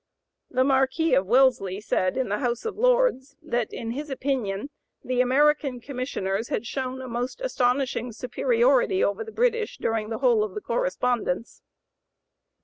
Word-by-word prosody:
The 255 - +2
Marquis 270 +4 +2
of 185 - +3
Wellesley 235 -6 +3
said, 185 -2 0
in 260 - 0
the 205 - -1
House 245 - -2
of 445 - -3
Lords, 485 - +2
that 240 -8 -2
"in 230 -1 -5
his 290 +5 -5
opinion 260 -4 -2 0.3
the 250 0 +1
American 275 0 +2
Commissioners 240 -5 -3
had 275 - -2
shown 260 +1 -4
a - - -7
most 245 - -4
astonishing 250 - 0
superiority 475 - +2
over 450 - 0
the 445 - -9
British 465 -1 0
during 220 -1 -1
the 225 - -3
whole 240 -4 +3
of 210 -3 -5
the 210 - -4
correspondence." 235 -1 -1
255 Hz, 150 wpm, -25 LUFS, 230-300 Hz, 0.3 s, of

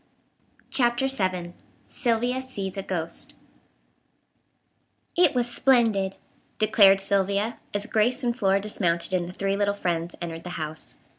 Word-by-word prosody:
CHAPTER 240 0 +2
VII 185 -9 0 0.3
SYLVIA 245 +2 0
SEES 200 -7 -5
A 195 - -3
GHOST 170 -3 -4 1.8
"It 345 -6 +4
was 245 -1 +1
splendid," 225 -7 +2 0.4
declared 205 -3 +5
Sylvia 200 +3 0
as 205 0 -2
Grace 240 +4 +1
and 240 -1 0
Flora 195 -5 +2
dismounted 185 -4 -1
and 175 -1 0
the - - -9
three 195 +1 -1
little 200 0 +1
friends 175 -3 -2
entered 165 -1 -6
the 180 - -7
house. 155 -1 -7
200 Hz, 130 wpm, -25 LUFS, 185-240 Hz, 1.8 s, declared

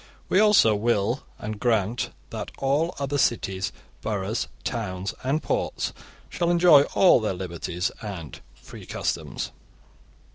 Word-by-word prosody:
We 190 - +4
also 210 - +6
will 115 +3 +1 0.2
and 105 0 -5
grant 115 -1 +1 0.2
that - - -5
all 150 +6 +1
other 140 0 -1
cities, 95 -6 0 0.3
boroughs, 105 0 -2 0.2
towns, 100 -5 -3
and 140 +5 0
ports - - -1 0.3
shall 170 - -1
enjoy 170 -5 +7
all 185 -8 +6
their 105 -4 -1
liberties 90 +2 -3
and 95 - -7
free - - -12
customs. - - -3
115 Hz, 120 wpm, -25 LUFS, 100-140 Hz, 0.3 s, enjoy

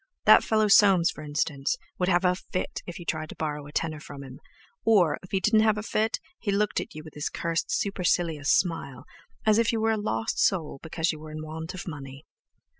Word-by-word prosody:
That - - +8
fellow 215 -1 +2
Soames, 195 -4 +6
for 155 - -10
instance, 145 -1 -1 0.2
would 180 0 +1
have 175 0 +3
a 180 - +4
fit 185 0 -4
if 175 - -6
you 175 - -9
tried 155 -1 -3
to - - -9
borrow 150 -2 -4
a - - -11
tenner 155 0 -2
from 140 -2 -10
him, 130 -1 -11 0.4
or, 190 -9 +4
if 185 - -13
he 195 - 0
didn't 215 +3 +3
have 215 -1 +3
a 210 - -3
fit, 220 0 0 0.2
he 205 - -1
looked 205 +1 +1
at - - -10
you 155 - -7
with 155 - -12
his 150 +1 -3
cursed 170 0 -2
supercilious 175 -6 0
smile, 150 -8 0 0.4
as 215 0 +4
if 230 0 +3
you 225 - -1
were 225 0 +2
a 220 - +1
lost 115 - -2
soul 165 -8 +1
because 160 +1 -1
you 155 - -8
were 155 0 -10
in 155 0 -6
want 160 +2 -6
of 185 - -7
money. 140 -2 -8
170 Hz, 225 wpm, -27 LUFS, 155-200 Hz, 0.4 s, That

